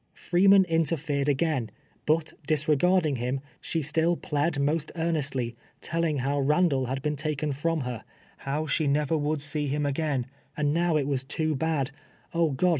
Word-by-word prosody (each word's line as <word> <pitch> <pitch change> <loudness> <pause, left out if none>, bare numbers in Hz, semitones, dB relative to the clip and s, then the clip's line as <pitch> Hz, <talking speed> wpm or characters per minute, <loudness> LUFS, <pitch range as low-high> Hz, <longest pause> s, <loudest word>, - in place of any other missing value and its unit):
Freeman 195 +2 +5
interfered 155 -4 0
again, 140 -5 0 0.4
bnt, 155 +1 +1
disregarding 155 0 +2
him, 125 +3 -1 0.2
she 165 -2 -2
still 160 +4 +1
plead 145 0 -1
most 150 +2 0
earnestly, 140 -8 -1 0.2
telling 165 -2 -1
how 140 +2 0
Ilandall 145 -2 +2
had 135 +2 -3
been 150 0 0
taken 150 0 -2
from 160 +3 -1
her 125 -4 -5 0.2
— - - -30
how 150 +3 -1
she 155 0 +1
never 145 +2 +1
wonld 150 -1 0
see 150 0 -2
him 145 +2 -1
again, 140 -3 0 0.3
and 145 -1 +1
now 170 -1 +2
it 145 - 0
was 135 -2 -1
too 155 +3 -1
bad 150 -1 -1 0.2
— - - -32
oh, 165 -1 +2
God 150 +6 +1
150 Hz, 170 wpm, -27 LUFS, 140-160 Hz, 0.4 s, Freeman